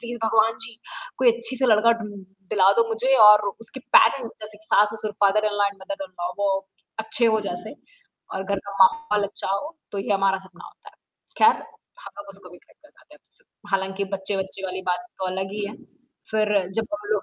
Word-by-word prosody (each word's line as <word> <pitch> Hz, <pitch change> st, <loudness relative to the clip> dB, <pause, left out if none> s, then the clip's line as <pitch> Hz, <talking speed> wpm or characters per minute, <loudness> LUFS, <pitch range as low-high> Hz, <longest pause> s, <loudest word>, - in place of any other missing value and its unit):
please 240 Hz, 0 st, -6 dB
भगवान 225 Hz, 0 st, +3 dB
जी, 225 Hz, 0 st, -12 dB, 0.4 s
कोई 250 Hz, -2 st, +5 dB
अच्छी 235 Hz, +2 st, 0 dB
से 260 Hz, 0 st, +1 dB
लड़का 225 Hz, +1 st, +5 dB
ढूँ 210 Hz, -, -6 dB, 0.5 s
दिला 195 Hz, -1 st, +5 dB
दो 230 Hz, -, +1 dB
मुझे 245 Hz, +4 st, +1 dB
और 210 Hz, -1 st, +7 dB
उसके 240 Hz, +4 st, -5 dB, 0.2 s
पैरेंट्स 230 Hz, +1 st, +3 dB
जैसे 210 Hz, 0 st, -7 dB
कि 215 Hz, -, -10 dB
सास-ससुर 210 Hz, 0 st, +2 dB
फादर-इन-लॉ 205 Hz, 0 st, +2 dB
एंड 200 Hz, -, -4 dB
मदर-इन-लॉ 190 Hz, -11 st, -6 dB
वो 200 Hz, -1 st, +1 dB, 0.5 s
अच्छे 220 Hz, +2 st, +1 dB
हो 220 Hz, -1 st, +2 dB
जैसे 215 Hz, +9 st, -6 dB, 0.6 s
और 190 Hz, 0 st, -3 dB
घर 200 Hz, 0 st, -1 dB, 0.2 s
माहौल 210 Hz, -1 st, +4 dB
अच्छा 195 Hz, -1 st, -3 dB
हो 300 Hz, +11 st, -5 dB, 0.2 s
तो 200 Hz, -, -4 dB
ये 200 Hz, +1 st, -1 dB
हमारा 195 Hz, -1 st, +2 dB
सपना 180 Hz, -1 st, -15 dB
होता -, -, -17 dB
है, -, -, -29 dB, 0.5 s
ख़ैर 445 Hz, -, +5 dB, 0.4 s
हम -, -, -9 dB
लोग 300 Hz, -, -9 dB
उसको 195 Hz, -2 st, -10 dB
भी 180 Hz, -, -14 dB
खरीदना 300 Hz, -, -25 dB
चाहते 300 Hz, -1 st, -21 dB
हैं -, -, -26 dB, 0.3 s
हालाँकि 195 Hz, 0 st, -1 dB
बच्चे-बच्चे 190 Hz, 0 st, -2 dB
वाली 185 Hz, 0 st, -4 dB
बात 180 Hz, +6 st, -1 dB
तो 190 Hz, -, -2 dB
अलग 190 Hz, +1 st, -3 dB
ही 210 Hz, -1 st, -3 dB
है 210 Hz, -, -7 dB, 0.6 s
फिर 215 Hz, -1 st, +1 dB, 0.3 s
जब 225 Hz, -1 st, 0 dB
हम 205 Hz, 0 st, -5 dB
लोग 210 Hz, -2 st, 0 dB
210 Hz, 190 wpm, -23 LUFS, 195-230 Hz, 0.6 s, और